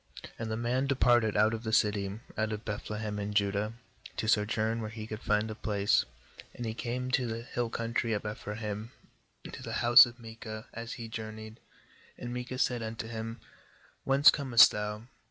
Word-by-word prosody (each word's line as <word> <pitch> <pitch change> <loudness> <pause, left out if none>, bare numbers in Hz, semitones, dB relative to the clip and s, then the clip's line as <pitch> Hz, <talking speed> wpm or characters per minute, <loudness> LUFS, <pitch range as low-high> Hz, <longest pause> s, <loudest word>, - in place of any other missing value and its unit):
8And 115 - -3
the 110 0 -2
man 125 +3 0
de 140 - +1
parted^out 110 -3 +4
of 110 - -3
the 110 -2 -3
city, 105 -2 +1 0.2
out 110 0 -1
of 105 +1 -5
Beth 105 -2 -5
lehem 105 -1 -3
in 105 0 -4
Judah, 100 +1 +1 0.4
to 110 - -2
sojourn 110 +1 +1
where 110 - -4
he 110 -1 -7
could 110 0 -7
find 105 +1 +1
a - - -3
place; 100 -2 +1 0.5
and 120 - -5
he 110 - -2
came 125 +2 -3
to 125 -1 +2
the 115 0 -4
hill 120 -1 -3
country 115 0 -1
of 105 0 -3
Ephraim 105 0 -5 0.6
to - - -8
the - - -6
house 120 +2 +10
of 120 0 -11
Micah, 110 -1 -8
as 115 0 -6
he 115 - -7
journeyed. 110 0 -7 0.6
9And 120 - -5
Micah 125 +1 -5
said 125 -2 +1
unto 110 0 -5
him: 115 0 -6 0.3
' - - -31
Whence 135 +1 +7
com 135 -5 -5
est 115 - +10
thou?' 105 +1 -4
110 Hz, 190 wpm, -30 LUFS, 105-120 Hz, 0.6 s, house